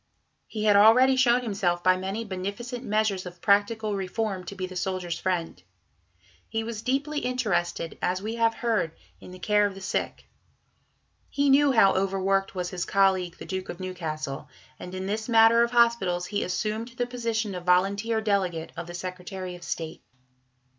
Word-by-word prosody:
He 215 -2 -4
had 210 -1 +5
already 240 +6 +6
shown 250 -1 +4
himself 185 -6 -1
by 185 0 +5
many 195 +5 -4
beneficent 205 +6 -5
measures 210 -4 0
of 175 0 -11
practical 210 +1 +2
reform 195 0 -3
to 200 - -7
be 185 -1 -3
the 185 0 -9
Soldiers' 180 -2 -3
Friend. 180 -3 -2 0.9
He 225 0 -2
was 220 -1 -5
deeply 280 +5 -1
interested, 210 - -2
as 180 +1 0
we 215 +3 -4
have 230 -1 +1
heard 195 -9 -1
(p. - - -30 0.2
80), - - -14
in - - -11
the 185 - -10
care 210 +2 +2
of 200 - -8
the - - -9
sick. 190 - -3 1.0
He 285 -1 +2
knew 285 +1 +5
how 225 -6 +5
over 195 0 0
worked 195 +1 0
was 180 -1 -3
his 180 -2 -3
colleague, 190 -3 +2
the - - -9
Duke 190 -1 -5
of 175 - -6
Newcastle, 160 -6 -5 0.3
and 180 +1 -8
in 185 0 -4
this 215 +3 -3
matter 225 0 +6
of 235 - +3
hospitals 235 -7 +2
he 205 +2 -2
assumed 215 +5 -2
the 245 - 0
position 230 -4 -2
of 180 -1 -6
volunteer 200 +5 +2
delegate 190 -6 -1
of 170 0 -6
the 175 - -7
Secretary 180 +1 -6
of 175 - -11
State. 165 -1 -5
195 Hz, 180 wpm, -26 LUFS, 185-225 Hz, 1.0 s, already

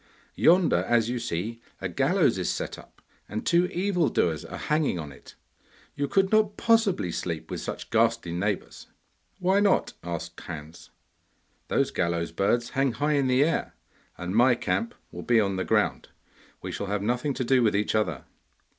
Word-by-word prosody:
Yonder, 175 +1 +4
as 120 -1 +3
you 125 - -2
see, 110 +4 -4 0.2
a - - -2
gallows - - +2
is - - -1
set - - -3
up, - - -18 0.3
and 105 +2 -4
two 175 +1 +3
evil 180 -3 0
doers 80 -3 0
are - - -8
hanging 150 - 0
on 75 -4 -6
it. - - -15 0.6
You 140 - -2
could 195 +4 +2
not 215 -2 +3
possibly 225 - +2
sleep 85 -2 -4
with - - -4
such - - -6
ghastly 85 - +2
neighbours.' 100 +3 -3 0.5
'Why 190 +1 +2
not?' 205 -1 +2
asked 85 -1 -5
Hans. 80 -1 -9 0.8
'Those - - +1
gallows 85 -1 -1
birds 115 +7 0
hang 135 -2 +1
high 145 +6 0
in 140 -2 +2
the 130 +2 +4
air, 165 +2 -1 0.4
and 90 +3 -4
my 120 +2 +5
camp 235 - -2 0.2
will - - -7
be 120 -2 +3
on 100 -2 +1
the 95 - -1
ground; - - 0 0.5
we - - -4
shall 100 - -4
have 100 0 -2
nothing 125 +5 -1
to 130 - -1
do 130 +1 +3
with 110 -3 +2
each 105 +1 0
other. 90 -10 -1
120 Hz, 175 wpm, -26 LUFS, -, 0.8 s, my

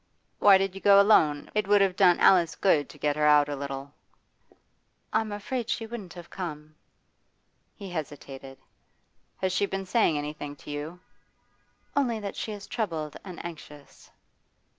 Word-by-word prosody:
'Why 200 -2 +7
did 195 -1 -1
you 195 - -9
go 200 -1 +7
alone? 160 -8 +3
It 210 -2 0
would 205 0 +5
have 195 -2 +2
done 180 -2 +4
Alice 175 -4 +4
good 160 -7 +2
to - - -13
get 145 -1 0
her 150 0 +2
out 150 -1 +5
a 145 - -3
little.' 140 0 -6 1.2
'I'm 220 0 0
afraid 230 +3 -4
she 230 - -2
wouldn't 215 -6 -8
have 175 -1 -11
come.' 155 -4 -7 1.0
He 195 -3 -9
hesitated. 135 -4 -7 0.8
'Has 185 -1 0
she 200 - +1
been 195 0 -4
saying 185 -6 +2
anything 145 0 -5
to 145 - -11
you?' 150 +4 -6 1.0
'Only 245 -6 +1
that 200 -2 -6
she 220 - -4
is 205 -1 -8
troubled 165 - -4
and 185 -3 -9
anxious. 150 -4 -11
180 Hz, 160 wpm, -27 LUFS, 150-200 Hz, 1.2 s, Why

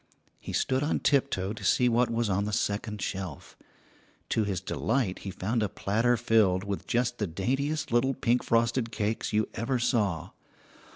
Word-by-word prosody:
He - - -7
stood 130 0 +1
on 145 - 0
tiptoe 130 -9 +1
to 110 - -10
see 125 - +3
what 120 +1 +3
was 115 0 0
on 100 +1 0
the 105 - -2
second 105 0 -2
shelf. 95 -7 -5 0.7
To 110 - +2
his 100 -4 -1
delight 110 +2 -1
he 100 - -6
found 110 +5 -1
a 105 - 0
platter 115 +4 +1
filled 105 -5 +3
with 100 -1 -4
just 120 0 0
the 105 - 0
daintiest 135 - -1
little 125 +3 +2
pink 120 -1 +1
frosted 115 0 +1
cakes 110 -1 -2
you 110 0 +1
ever 120 +3 -1
saw. 105 - 0
115 Hz, 170 wpm, -28 LUFS, 100-120 Hz, 0.7 s, see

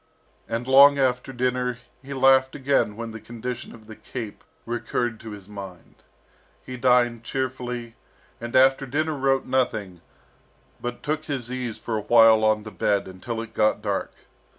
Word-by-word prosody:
And 115 +2 -3
long 140 +2 +8
after 130 -1 0
dinner 125 -1 -1 0.2
he 140 +1 -11
laughed 130 0 +4
again 135 -6 +1
when 115 0 -6
the 110 -1 -9
condition 120 +3 -6
of 110 -2 -16
the 110 0 -11
"cape" 115 -3 -8 0.2
recurred 120 0 -2
to 110 - -9
his 100 -3 -10
mind. 100 -4 -10 0.7
He 130 - -6
dined 120 -2 +2
cheerfully, 125 -2 -4 0.5
and 120 0 -6
after 135 +1 +4
dinner 155 +4 -1
wrote 135 -1 +1
nothing, 105 -9 -1 0.8
but 120 0 -5
took 155 +1 -2
his 130 -5 -4
ease 125 -3 -4
for 110 -2 -3
a 105 - -10
while 115 -2 +7
on 110 -1 +2
the 110 - -8
bed, 100 -2 0
until 95 +5 -6
it 115 - -9
got 110 -1 +1
dark. 100 -2 -2
120 Hz, 160 wpm, -24 LUFS, 110-130 Hz, 0.8 s, long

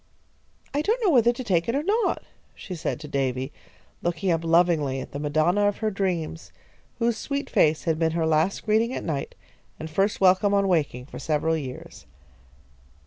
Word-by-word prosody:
"I 290 - +1
don't 440 +9 +1
know 385 - +4
whether 240 -4 +5
to 245 +2 -6
take 185 -4 +1
it 235 - +1
or 285 - 0
not," 430 +6 0 0.3
she 185 - -8
said 165 -4 -3
to 150 - -7
Davy, 135 -1 -2 0.5
looking 175 +2 -1
up 165 0 0
lovingly 165 -5 +2
at - - -8
the 140 - -5
Madonna 155 +7 +2
of 205 - 0
her 220 -1 -1
dreams, 175 -5 -3 0.5
whose 235 -1 +1
sweet 280 +4 -4
face 155 0 +3
had 160 -2 0
been 160 -1 +1
her 165 -1 0
last 160 +4 +1
greeting 225 +3 +2
at - - -4
night, 150 -4 -3 0.4
and 160 0 -7
first 195 +6 +1
welcome 190 +2 +4
on 200 0 +2
waking, 150 -8 0
for - - -9
several 160 +1 0
years. 135 -5 -8
170 Hz, 185 wpm, -25 LUFS, 155-210 Hz, 0.5 s, whether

